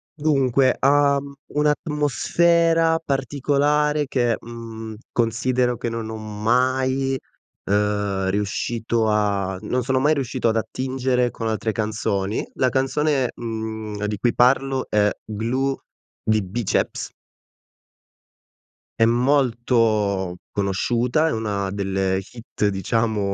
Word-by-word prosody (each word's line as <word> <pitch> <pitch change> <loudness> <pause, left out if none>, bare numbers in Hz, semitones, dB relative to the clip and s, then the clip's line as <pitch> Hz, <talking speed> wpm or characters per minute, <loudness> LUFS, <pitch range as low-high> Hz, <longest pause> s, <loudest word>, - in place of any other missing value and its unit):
Dunque, 135 -4 +2
ha 140 0 +4 0.4
un'atmosfera 165 +3 +2
particolare 145 +2 +1
che, 120 -4 +1
mhmm, 115 -1 -8 0.2
considero 120 +2 +1
che 115 - -3
non 115 -1 -4
ho 110 - -5
mai 130 +5 0 0.5
ehm, 100 -1 0
riuscito 110 +3 -1
a 100 -3 0
non 125 +4 0
sono 130 +1 0
mai 150 +3 +3
riuscito 130 -4 -1
ad 110 - +1
attingere 130 +1 -1
con 115 - -4
altre 110 0 -1
canzoni. 105 -2 -2
La 130 - +2
canzone, 135 +1 +1
mhmm, 110 -2 -5
di 105 -1 -2
cui 120 +2 +1
parlo 130 +1 +3
è 105 -1 +3 0.2
Glue 125 +6 -1 0.4
di 110 -2 +1
Biceps. 105 +3 -1 1.9
È 115 - +6
molto 115 -7 +2 0.2
conosciuta, 120 +9 +1
è - - 0
una 100 -3 -2
delle 95 -1 0
hit 105 +1 -4
diciamo, 100 +1 0
115 Hz, 105 wpm, -22 LUFS, 105-135 Hz, 1.9 s, È